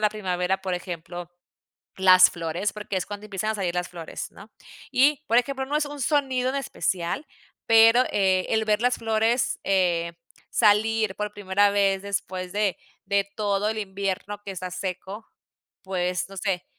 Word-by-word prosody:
la 210 -1 +3
primavera, 190 -2 -1
por 185 -1 -1
ejemplo, 175 -1 -6 0.7
las 185 -1 +7
flores, 170 +4 -3
porque 210 -2 -5
es 185 - -2
cuando 205 +1 -7
empiezan 210 +1 -2
a 220 - -1
salir 180 -3 -2
las 180 0 -1
flores, 170 -2 -7
¿no? 205 +2 -15 0.4
Y, 285 +3 +4
por 230 - +2
ejemplo, 265 +1 -1
no 295 +2 0
es 300 - +1
un 290 0 -8
sonido 260 -2 +1
en 270 - -5
especial, 185 - -2 0.4
pero, 225 +2 +7
eh, 190 -2 +2
el 220 -1 +2
ver 215 0 +2
las 245 0 +3
flores, 225 +2 +1
eh, 175 -3 +1 0.4
salir 215 -1 +3
por 210 0 -3
primera 205 0 +2
vez 195 -1 +2
después 185 -2 -4
de 205 -2 0 0.3
de 200 0 +1
todo 205 -1 0
el 220 - -3
invierno 200 0 -3
que 200 - -5
está 185 0 -5
seco, 190 +4 -5 0.6
pues, 180 -1 -2
no 195 - -12
sé, 185 -2 -1
200 Hz, 170 wpm, -25 LUFS, 185-220 Hz, 0.7 s, las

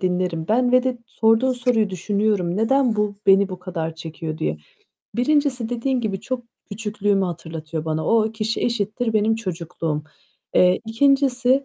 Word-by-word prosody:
dinlerim. 180 -3 -1
Ben 245 +3 +2
ve 255 0 +6
de 255 -2 -1
sorduğun 225 +2 +2
soruyu 240 -4 +1
düşünüyorum. 200 -1 0
"Neden 240 +1 +2
bu 210 -1 0
beni 195 0 +6
bu 185 - -6
kadar 170 -3 -4
çekiyor?" 160 -1 -6
diye. 75 0 -1 0.6
1'ncisi 255 -2 +1
dediğin 245 +2 -1
gibi 200 -4 -2
çok 255 -2 -4 0.3
küçüklüğümü 205 -2 0
hatırlatıyor 160 -2 -5
bana. 160 0 -2
O 220 -1 +3
kişi 220 0 -2
eşittir 225 0 -1
benim 215 +1 +2
çocukluğum. 165 -6 -3 0.5
Eee, 180 0 +4
2'ncisi 265 +1 +3
215 Hz, 145 wpm, -22 LUFS, 180-245 Hz, 0.6 s, ve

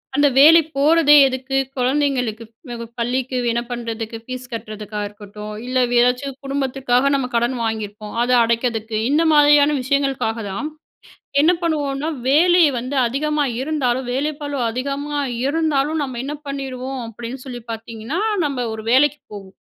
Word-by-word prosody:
அந்த 290 +1 +4
வேலைக்கு 315 +3 +7
போறதே 300 0 +5
எதுக்கு? 265 +1 -3 0.2
குழந்தைங்களுக்கு 255 -4 0 0.3
ப் 235 -1 -5 0.2
பள்ளிக்கு 255 +2 -1
என்ன 235 +1 0
பண்ணுறதுக்கு? 230 -1 -5
ஃபீஸ் 255 0 -7
கட்டுறதுக்கா 215 -1 -6
இருக்கட்டும் 210 0 -10
இல்ல, 255 0 +1 0.2
ஏதாச்சும் 250 +2 +1
குடும்பத்துக்காக 270 -1 0
நம்ப 270 -2 -1
கடன் 240 +2 +1
வாங்கியிருப்போம். 210 -1 -4
அத 245 - 0
அடைக்குறதுக்கு 230 -1 -1
இந்த 300 +4 +3
மாதிரியான 295 0 +5
விஷயங்களுக்காக 270 -4 0
தான் 275 +11 -4 0.7
என்ன 320 +4 +5
பண்ணுவோம்னா, 295 -3 -1 0.2
வேலை 345 +5 +5 0.2
வந்து 255 +4 -5
அதிகமா 300 +4 0 0.2
இருந்தாலும், 260 -4 -1
வேலை 285 +4 0
பளு 285 -1 -3
அதிகமா 280 +4 -3 0.3
இருந்தாலும், 310 0 0
நம்ப 260 -3 -5
என்ன 285 +2 -4
பண்ணீருவோம் 270 -1 -5
அப்டீன்னு 235 +3 -8
சொல்லி 245 -2 -7
பாத்தீங்கன்னா, 225 +6 -5 0.3
நம்ப 280 -3 -2 0.2
ஒரு 220 - -8
வேலைக்கு 290 +3 +4
போவோம் 195 -2 -10
260 Hz, 135 wpm, -20 LUFS, 235-285 Hz, 0.7 s, வேலைக்கு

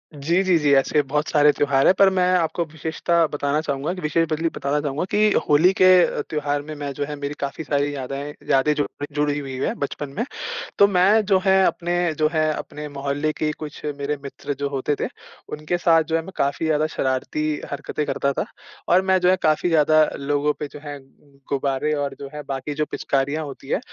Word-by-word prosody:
जी, 165 +6 +1
जी, 185 -3 +3
जी। 150 -2 +2
ऐसे 135 +2 +3
बहुत 150 +2 -2
सारे 150 -1 +5
त्योहार 140 -2 +2
है - - +8
पर 195 0 +5
मैं 190 -1 +1
आपको 170 0 0
विशेषता 160 +2 0
बताना 145 0 -1
चाहूँगा, 140 0 -2
विशेष 165 +2 +1
बदली 160 +2 0
बताना 140 +2 -1
चाहूँगा 145 +1 -2
की 210 0 +3 0.2
होली 160 +6 +5
के - - +8 0.2
अ, - - -3
त्योहार 145 -2 -1
में 155 +2 -8
मैं 145 -1 -5
जो 145 - -3
है 150 - -6
मेरी 145 0 -4
काफ़ी 140 +3 -4
सारी 145 0 0
यादें 140 +2 -5 0.2
यादें 135 +3 +3
जुड़ी 145 -1 -3
जुड़ी 145 0 +1
हुई 135 -2 -6
है - - 0
बचपन 145 0 -4
में। 230 - +1 0.6
तो 200 - +8
मैं 200 +3 +4
जो 195 -1 +3
है, 190 0 +5
अपने 175 -1 0
जो 155 - +4
है 155 -1 +2
अपने 150 0 -7
मोहल्ले 140 +2 -2
के 155 0 -1
कुछ 150 -2 -8 0.2
मेरे 145 +1 -2
मित्र 140 +1 -5
जो 140 0 -1
होते 140 +1 -1
थे, - - -1 0.4
उनके 155 +4 -2
साथ 165 -2 +4
जो 160 +1 -2
है 165 - +1
मैं 190 - -9
काफ़ी 140 +3 0
ज़्यादा 155 0 +2
शरारती 150 +2 -2
हरकतें 150 +1 -3
करता 140 - 0
था। - - -2 0.4
और 180 - +5
मैं 190 0 +4
जो 180 - +4
है 185 - +5
काफ़ी 155 +3 +2
ज़्यादा 155 -1 +5 0.2
लोगों 145 +1 0
पे 150 - -3
जो - - -8
है 145 -1 -6 0.5
गुब्बारे 140 +2 0
और 145 -2 -2
जो 140 - -7
है 150 - -5
बाकी 135 +2 -4
जो 150 +1 0
पिचकारियाँ 140 +3 -1
होती 135 -1 -10
है, - - +1
150 Hz, 210 wpm, -22 LUFS, 140-160 Hz, 0.6 s, है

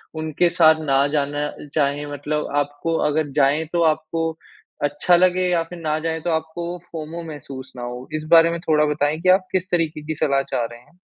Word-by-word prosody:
उनके 155 +2 +1
साथ 165 -2 +5
ना 140 -2 +2
जाना 145 0 -1 0.2
चाहें 145 -1 0
मतलब 150 +2 -2
आपको 145 +3 -1
अगर 150 0 0
जाएँ, 145 +2 +2
तो 170 - +2
आपको 160 +1 0 0.5
अच्छा 145 +5 +3
लगे 185 +1 +3
या 170 -2 +2
फिर 170 +1 -10
ना 155 -1 -1
जाएँ 160 0 -2
तो 175 - -2
आपको 160 +2 -3
वो, 180 - -5
फोमो 165 +1 -6
महसूस 135 -4 -9
ना 125 - -7
हो? 125 +1 -6
इस 155 0 -2
बारे 165 0 +7
में 170 - -3
थोड़ा 155 -3 +3
बताएँ 150 +1 0
कि 185 - +2
आप 185 0 +4
किस 185 0 -1
तरीक़े 165 -3 0
की 155 - -2
सलाह 140 -2 +1
चाह 120 - 0
रहे 120 +1 -9
हैं। 170 +9 -25
155 Hz, 205 wpm, -22 LUFS, 145-165 Hz, 0.5 s, बारे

